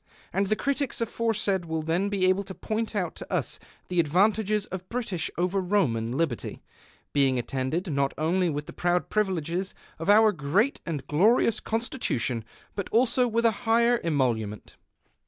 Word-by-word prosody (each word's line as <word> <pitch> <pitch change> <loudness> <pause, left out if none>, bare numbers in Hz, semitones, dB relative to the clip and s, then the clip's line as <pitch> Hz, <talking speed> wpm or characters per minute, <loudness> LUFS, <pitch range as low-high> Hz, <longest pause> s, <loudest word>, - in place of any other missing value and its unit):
And 195 0 +1
the 215 - +2
critics 280 +2 -1
aforesaid 215 -5 0
will 160 -1 -2
then 170 +5 0
be 195 -2 +1
able 185 +1 +3
to 190 - -8
point 220 0 -3
out 180 -5 -1
to - - -9
us - - -1 0.3
the 180 -1 -1
advantages 205 +6 +2
of 185 0 -7
British 220 -9 -2
over 180 +3 +1
Roman 140 - +1
liberty, 140 -4 -2 0.5
being 135 -3 +3
attended 135 - -2
not 140 0 +1
only 175 +3 +1
with 150 -1 -3
the - - -10
proud 175 0 0
privileges 185 -3 -1 0.2
of 165 - -3
our 215 +1 +7
great 185 - +1
and 155 -4 -3
glorious 210 +8 +3
Constitution, 175 - -2 0.3
but 200 - -4
also 250 +2 +3
with 230 0 0
a 230 - +6 0.2
higher 235 +1 +4
emolu 130 - +1
ment. 105 - -11
185 Hz, 160 wpm, -27 LUFS, 155-215 Hz, 0.5 s, our